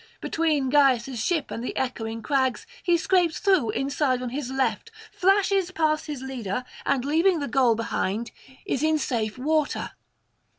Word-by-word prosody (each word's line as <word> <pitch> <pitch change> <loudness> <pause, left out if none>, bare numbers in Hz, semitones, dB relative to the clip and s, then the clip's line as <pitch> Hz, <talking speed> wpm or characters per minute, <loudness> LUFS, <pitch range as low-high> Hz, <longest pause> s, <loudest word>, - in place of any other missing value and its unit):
Between 305 -5 0
Gyas' 265 -4 +3
ship 330 -5 -1
and 230 - -4
the - - -4
echoing 230 -3 -3
crags 260 - 0 0.2
he 345 -1 +3
scrapes 345 -1 +2
through 375 - +2
inside 270 +2 0
on 250 - -3
his 265 0 -4
left, 265 - -1 0.2
flashes 390 -1 +2
past 315 -3 0
his 290 -4 -5
leader, 250 -3 -4 0.2
and 270 -2 +1
leaving 330 +5 +3
the 285 - -3
goal 255 -5 +3
behind 225 0 -2 0.3
is 270 - -1
in 310 0 +3
safe 230 -6 -2
water. 305 +3 0
275 Hz, 155 wpm, -25 LUFS, 245-315 Hz, 0.3 s, Gyas